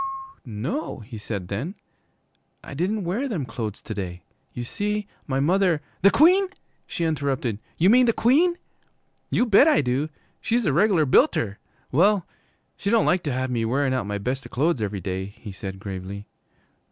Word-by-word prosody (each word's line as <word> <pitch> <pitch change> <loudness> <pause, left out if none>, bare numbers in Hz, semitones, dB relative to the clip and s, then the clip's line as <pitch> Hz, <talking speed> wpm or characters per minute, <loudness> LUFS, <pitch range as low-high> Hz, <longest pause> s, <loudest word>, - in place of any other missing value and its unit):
'No,' 125 - -4
he 110 0 -9
said 100 -4 -5
then, 130 - -4 0.9
'I - - -9
didn't 190 +8 -1
wear 205 +11 -1
them 180 - -2
clo'es 115 -3 -5
to 110 - -5
day. 90 -3 -5 0.3
You 120 - -5
see, 210 - -2 0.2
my 135 -2 0
mother 175 +2 +3
' - - -36
'The 200 - +7
Queen,' 365 - +5 0.4
she 170 - -3
interrupted; 140 -8 -1 0.2
'you 175 - +4
mean 250 +1 +6
the - - +5
Queen?' 310 +11 +3 0.7
'You 245 - +2
bet 230 +6 +6
I 310 - +5
do! 135 +4 -1 0.3
She's 235 0 +1
a 150 - +2
reg'lar 175 -1 +4
builter! 110 -5 +3 0.3
Well, 185 +6 +3 0.5
she 200 - -2
don't 230 +1 +4
like 180 0 +3
to 145 - 0
have 130 0 -2
me 115 -2 0
wearin' 130 +4 +1
out 125 -6 -1
my 105 0 -2
best 125 +4 -3
clo'es 145 0 +1
every 100 -2 -2
day,' 95 +1 -3
he 105 - -9
said 95 0 -7
gravely. 100 0 -6
140 Hz, 175 wpm, -24 LUFS, -, 0.9 s, The